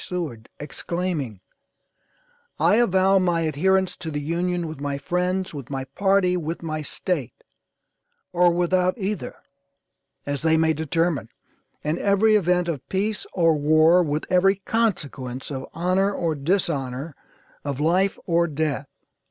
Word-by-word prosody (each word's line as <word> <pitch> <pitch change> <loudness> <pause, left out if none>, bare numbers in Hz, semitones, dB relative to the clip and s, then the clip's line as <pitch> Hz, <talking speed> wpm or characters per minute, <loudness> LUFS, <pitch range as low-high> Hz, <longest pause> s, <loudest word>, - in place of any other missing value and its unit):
Seward, 155 -11 -5
exclaiming: 150 - -3 1.2
"I 210 - +4
avow 195 -4 +4
my 175 -2 +1
adherence 185 +5 +1
to 160 - -6
the 145 -1 -3
Union 170 +3 -1
with 155 -3 -8
my 140 -1 -2
friends, 180 +5 -1
with 140 -4 -8
my 135 -1 -3
party, 185 +6 +2
with 165 0 -4
my 155 -1 -3
State; 145 -4 -3 0.9
or 175 0 +5
without 180 +2 +1
either, 205 0 -3 0.9
as 145 -1 -3
they 160 0 +3
may 160 0 +3
determine, 160 -4 -1 0.5
in 150 +2 -1
every 210 +2 +3
event 180 -3 +2
of 150 -7 -4
peace 205 +2 -1
or 165 -3 +4
war, 155 +4 +5
with 150 -2 -1
every 185 +2 +4
consequence 145 - -2
of 130 -1 -5
honor 185 +3 +1
or 170 -5 -1
dishonor, 145 -3 -2 0.5
of 140 -2 -3
life 180 +6 +2
or 170 -1 +2
death." 150 -2 -2
170 Hz, 135 wpm, -24 LUFS, 145-185 Hz, 1.2 s, or